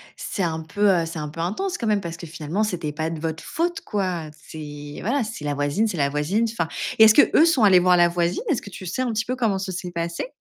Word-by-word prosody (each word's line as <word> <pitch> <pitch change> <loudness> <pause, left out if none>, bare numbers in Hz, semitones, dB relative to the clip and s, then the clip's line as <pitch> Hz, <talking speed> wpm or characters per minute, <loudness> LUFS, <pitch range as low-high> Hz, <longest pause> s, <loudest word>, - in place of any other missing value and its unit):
c'est 200 - -4
un 160 -3 -1
peu, 205 +6 +1
heu, 170 -3 +3
c'est 165 -1 -6
un 150 - -4
peu 165 +3 -6
intense 355 - -2
quand 230 - -3
même, 210 -1 +3
parce 170 -3 -6
que 170 - -9
finalement, 165 +5 -3
c'était 170 -7 -3
pas 155 +1 -2
de 165 -1 -5
votre 160 0 -4
faute, 345 +1 -2
quoi. 185 -6 -2 0.2
C'est, 145 -1 -8
voilà, 245 +3 0
c'est 215 -8 -7
la 145 -1 -1
voisine, 145 +10 0
c'est 180 - -4
la 140 - +2
voisine, 150 +11 0
enfin 165 -8 -2 0.3
et 220 - +8
est-ce 220 -1 +8
que 290 - +6
eux - - +7
sont 305 -9 +3
allés 190 -3 +7
voir 180 0 +4
la 175 - +6
voisine? 170 - -1
Est-ce 285 - +1
que 200 - -10
tu 185 - -9
sais 185 +9 -2
un 250 -2 0
petit 220 0 -1
peu 255 - -2
comment 220 -6 0
ça 190 -1 -4
s'est 180 0 -5
passé? 170 +5 -3
180 Hz, 275 wpm, -23 LUFS, 160-215 Hz, 0.3 s, et